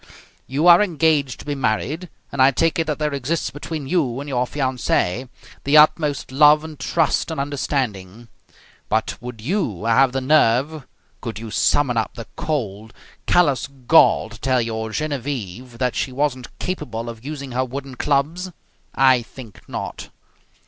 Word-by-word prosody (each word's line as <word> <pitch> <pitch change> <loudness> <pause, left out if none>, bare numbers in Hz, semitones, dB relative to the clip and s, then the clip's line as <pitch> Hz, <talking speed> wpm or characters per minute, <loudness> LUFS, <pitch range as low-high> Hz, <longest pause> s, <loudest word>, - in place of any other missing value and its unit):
You 140 +5 -1
are 175 +2 +8
engaged 155 - +1
to - - -14
be 145 - -2
married 145 +7 -2 0.2
and 140 - -1
I 130 - +7
take 165 +5 +1
it 165 - 0
that 150 - -1
there 150 -1 -1
exists 140 +5 -2
between 150 0 -6
you 135 -7 0
and 140 - -6
your 125 -3 0
fiancee 130 -4 -1 0.3
the 140 +2 +4
utmost 150 -3 +3
love 150 +2 +6
and 155 -2 -9
trust - - 0
and 160 -3 -4
understanding; 120 -7 -3 0.6
but 110 +1 0
would 120 -2 -8
you 125 - -2
have 125 +3 +4
the 135 - -1
nerve, 135 +1 +2 0.3
could 115 -4 -5
you 110 0 -7
summon 130 -1 +2
up 110 - -1
the 115 -1 -7
cold, 110 -8 -3 0.3
callous 145 -8 +3
gall 135 -3 +3
to 110 -1 -12
tell 130 -1 +2
your 110 -1 -3
Genevieve 125 -4 -4
that 125 0 0
she 130 - -1
wasn't 130 -2 -1
capable 125 -11 -4
of 115 -1 -8
using 140 -2 -6
her 130 +2 0
wooden 135 +1 -6
clubs? 150 +7 -1 0.5
I 130 -2 +5
think 115 -2 -12
not. - - -6
135 Hz, 160 wpm, -21 LUFS, 120-150 Hz, 0.6 s, are